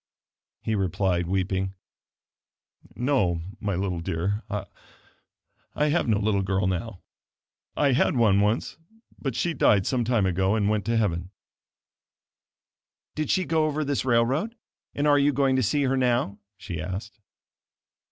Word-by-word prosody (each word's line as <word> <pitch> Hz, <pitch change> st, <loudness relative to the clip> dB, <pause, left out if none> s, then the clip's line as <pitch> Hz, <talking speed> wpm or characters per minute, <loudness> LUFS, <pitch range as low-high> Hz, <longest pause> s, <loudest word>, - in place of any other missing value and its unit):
He 110 Hz, -, -1 dB
replied, 95 Hz, -3 st, 0 dB
weeping, 95 Hz, +1 st, -1 dB, 1.2 s
"No 120 Hz, -10 st, +1 dB, 0.2 s
my 100 Hz, -3 st, -2 dB
little 90 Hz, -1 st, -2 dB
dear 90 Hz, +6 st, -2 dB
I 105 Hz, +7 st, -7 dB
have 165 Hz, -1 st, +1 dB
no 110 Hz, -3 st, +3 dB
little 105 Hz, -1 st, +1 dB
girl 95 Hz, 0 st, 0 dB
now. 95 Hz, +2 st, -3 dB, 0.7 s
I 140 Hz, -2 st, +3 dB
had 130 Hz, +2 st, +2 dB
one 105 Hz, -5 st, +4 dB
once; 105 Hz, +3 st, 0 dB, 0.4 s
but 135 Hz, -5 st, -3 dB
she 170 Hz, -, 0 dB
died 100 Hz, -10 st, +3 dB
some 125 Hz, -2 st, +1 dB
time 115 Hz, -4 st, +1 dB
ago, 95 Hz, +2 st, +1 dB
and 105 Hz, -2 st, +1 dB
went 105 Hz, -2 st, 0 dB
to 115 Hz, +1 st, +1 dB
heaven." 90 Hz, -5 st, 0 dB, 1.8 s
"Did 155 Hz, -1 st, -3 dB
she 185 Hz, -1 st, +2 dB
go 160 Hz, -1 st, +2 dB
over 155 Hz, 0 st, -1 dB
this 140 Hz, -1 st, -1 dB
railroad, 130 Hz, -, +1 dB, 0.4 s
and 145 Hz, -, 0 dB
are 145 Hz, -1 st, +5 dB
you 145 Hz, +1 st, +4 dB
going 135 Hz, -1 st, +2 dB
to -, -, +2 dB
see 140 Hz, +6 st, +1 dB
her 135 Hz, 0 st, +1 dB
now?" 120 Hz, -5 st, +1 dB, 0.2 s
she 90 Hz, -4 st, -6 dB
asked. 95 Hz, +6 st, -6 dB
110 Hz, 140 wpm, -26 LUFS, 95-135 Hz, 1.8 s, are